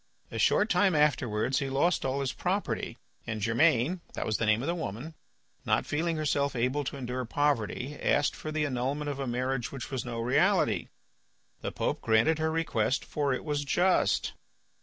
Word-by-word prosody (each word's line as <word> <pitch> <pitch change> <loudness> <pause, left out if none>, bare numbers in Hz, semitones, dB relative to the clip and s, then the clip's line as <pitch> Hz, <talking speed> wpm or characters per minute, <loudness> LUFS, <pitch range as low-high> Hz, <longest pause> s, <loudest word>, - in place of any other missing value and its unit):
A - - -4
short 210 - +4
time 200 -7 +3
afterwards 130 -4 +2
he 140 -2 -2
lost 145 +7 +2
all 135 +1 -1
his 135 -2 -1
property, - - -2 0.3
and 110 -2 -3
Germaine 130 - +2
(that - - -2
was 110 - 0
the 115 - -1
name 110 +3 +3
of - - -3
the 170 - +1
woman), 155 - -5 0.5
not - - +1
feeling 165 +2 -1
herself 140 -2 0
able 130 +5 0
to 140 - -4
endure 125 -1 -3
poverty, 140 0 -1
asked 145 - +2
for 155 - -6
the 155 -1 0
annulment 140 +2 -2
of 140 - -6
a 135 - -2
marriage 125 0 -1
which 135 -1 -7
was 130 -2 -2
no 120 -2 -5
reality. 125 - +2 0.7
The - - -3
Pope - - -2
granted 115 +8 +3
her 160 0 +1
request, 160 -7 0
for 145 -2 -1
it 130 - -2
was 145 -2 -1
just. 180 +6 +2
140 Hz, 180 wpm, -29 LUFS, 120-155 Hz, 0.7 s, short